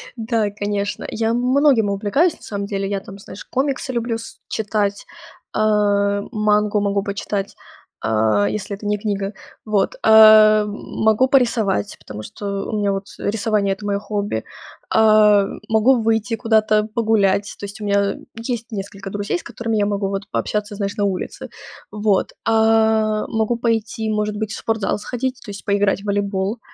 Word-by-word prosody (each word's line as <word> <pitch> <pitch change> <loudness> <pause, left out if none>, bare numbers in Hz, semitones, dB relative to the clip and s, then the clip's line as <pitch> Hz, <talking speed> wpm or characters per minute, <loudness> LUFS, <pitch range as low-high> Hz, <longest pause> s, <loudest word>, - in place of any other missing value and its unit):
Да, 225 -2 0
конечно. 205 0 -3
Я 225 0 -1
многим 250 -2 +3
увлекаюсь 210 - +1
на - - -27
самом 200 -1 -4
деле. 195 -1 -3
Я 200 -1 -1
там, 195 0 -11
знаешь, 195 - -11
комиксы 270 0 -2
люблю 235 -1 -1
с 225 - -11
читать. 205 -2 -2 0.5
Э, 205 -1 +2
мангу 210 -1 +2
могу 200 -1 0
почитать, 200 0 -4 0.5
э, 110 -2 +2
если 205 0 -4
это 205 - -11
не 210 0 +1
книга. 200 -1 -3 0.3
Вот, 210 -3 0
э, 215 -1 +8
могу 220 +3 0
порисовать, 230 -7 +1
потому 105 0 -9
что 200 - -5
у 215 - -1
меня 200 -1 +1
вот, 195 0 -4
э, - - -1
рисование- 210 -2 0
это 205 +2 -9
моё 200 -1 0
хобби. 205 - -3 0.5
А, 215 -2 +5 0.2
могу 225 +3 +4
выйти 225 +1 0
куда-то 215 -2 +2
погулять. 205 -3 +1
То - - -5
есть 200 +1 -9
у - - -4
меня, 200 0 +2
э, - - -11 0.2
есть 230 0 -5
несколько 195 -1 -6
друзей, 205 -2 -2
с - - -13
которыми 230 -1 -3
я 205 - +2
могу 200 -1 -1
вот 195 0 -3
пообщаться, 210 0 -2
знаешь, 200 -1 -3
на 205 - 0
улице. 190 -2 -4 0.4
Вот. 210 -2 +1
А, 220 -1 +3
могу 225 +1 0
пойти, 225 -1 -1
может 210 0 -1
быть, 215 0 -3
в - - -5
спортзал 220 -3 -1
сходить, 255 +3 -4
то 205 - -7
есть 200 - -9
поиграть 200 -1 +1
в - - -12
волейбол, 200 +1 -1
210 Hz, 165 wpm, -20 LUFS, 200-220 Hz, 0.5 s, э